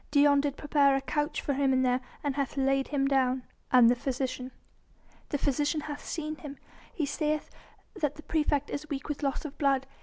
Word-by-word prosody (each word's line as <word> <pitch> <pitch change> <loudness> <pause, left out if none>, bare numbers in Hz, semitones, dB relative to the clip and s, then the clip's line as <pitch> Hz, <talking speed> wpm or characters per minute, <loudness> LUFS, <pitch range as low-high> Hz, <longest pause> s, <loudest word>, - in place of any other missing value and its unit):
Dion 285 -1 +5
did 285 -1 -2
prepare 285 -2 +3
a 270 - 0
couch 295 +3 -1
for 285 - -1
him 265 -1 +2
there, 250 0 +2 0.2
and 285 -2 -1
hath 280 -1 -2
laid 270 0 +2
him 275 -2 +1
down." 260 -2 +2 0.3
"And 250 -2 +7
the 240 - +6
physician?" 255 0 -3 0.8
"The 290 - 0
physician 290 +3 0
hath 290 -1 -6
seen 310 -1 -4
him. 285 -2 -8 0.3
He 310 - -1
saith 300 +1 -1 0.4
that 300 -6 -1
the 305 - -11
praefect 295 -2 0
is 300 +2 -5
weak 280 -2 -4
with 295 0 -4
loss 275 +1 -1
of 295 -1 -8
blood. 275 -2 +2
280 Hz, 190 wpm, -29 LUFS, 270-295 Hz, 0.8 s, And